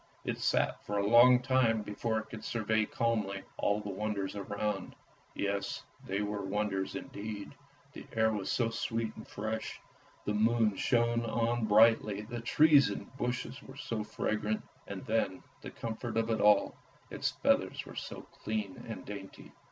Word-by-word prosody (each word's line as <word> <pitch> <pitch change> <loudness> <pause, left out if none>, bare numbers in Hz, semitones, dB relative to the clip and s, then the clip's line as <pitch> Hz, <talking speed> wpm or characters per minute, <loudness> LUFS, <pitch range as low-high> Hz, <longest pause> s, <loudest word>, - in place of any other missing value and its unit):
It - - -2
sat - - +1
for 105 - -2
a 100 - +1
long 125 +3 +7
time 120 -4 +3
before 110 +2 -2
it 110 - -5
could 110 - -7
survey 110 -1 +1
calmly 105 -4 -1
all 105 +1 +1
the 105 - -5
wonders 100 0 -2
around. 100 -1 -3 0.4
Yes, 100 0 -2 0.2
they 100 +2 0
were 105 0 -2
wonders 95 -1 -1
indeed, 105 0 -6 0.4
the - - -10
air 110 0 +3
was 100 -3 -2
so 115 -2 +1
sweet 115 0 -2
and 110 - -10
fresh, 110 +1 -4 0.5
the 105 - 0
moon 110 0 +3
shone 120 +1 +2
on 115 0 +1
brightly, 110 -1 +5
the 115 +2 -6
trees 145 +3 +6
and - - -6
bushes 125 0 -3
were 135 +1 -12
so 115 -7 -3
fragrant; 110 0 -1 0.2
and 100 -2 -6
then 105 -4 0 0.2
the - - -7
comfort 115 0 -4
of 115 0 +1
it 110 - +1
all, 105 -1 +5 0.4
its - - 0
feathers - - +2
were - - -10
so - - -6 0.2
clean 105 -3 -3
and 110 - -6
dainty. 100 -1 -9
110 Hz, 160 wpm, -32 LUFS, 105-115 Hz, 0.5 s, long